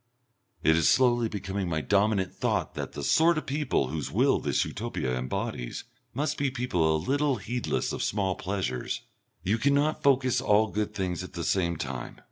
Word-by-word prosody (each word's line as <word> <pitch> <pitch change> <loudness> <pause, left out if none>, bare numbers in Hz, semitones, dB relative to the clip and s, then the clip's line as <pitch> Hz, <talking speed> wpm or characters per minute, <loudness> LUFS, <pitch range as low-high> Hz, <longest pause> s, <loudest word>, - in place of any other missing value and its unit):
It 80 - +5
is 80 -4 +4
slowly 120 -3 +3
becoming 95 -2 -3
my 80 -2 0
dominant 100 0 +1
thought - - -1
that - - -5
the 70 - -5
sort 165 - +4
of 155 - -3
people 140 - 0
whose 75 -1 -4
will - - +3
this - - 0
Utopia 65 -1 -3
embodies 65 -1 -3 0.3
must 150 +4 -1
be 140 -1 +1
people 90 -12 +1
a - - +2
little 140 - +1
heedless 120 +3 -2
of - - -3
small 95 -2 0
pleasures. 90 -11 -3 0.4
You 105 +5 +1
cannot 145 +4 +2
focus 130 -2 +3
all 110 -3 +3
good 105 0 -2
things 90 -2 -2
at 90 - -9
the 85 - -4
same 85 -3 +1
time. 65 -5 -5
100 Hz, 175 wpm, -28 LUFS, 85-130 Hz, 0.4 s, It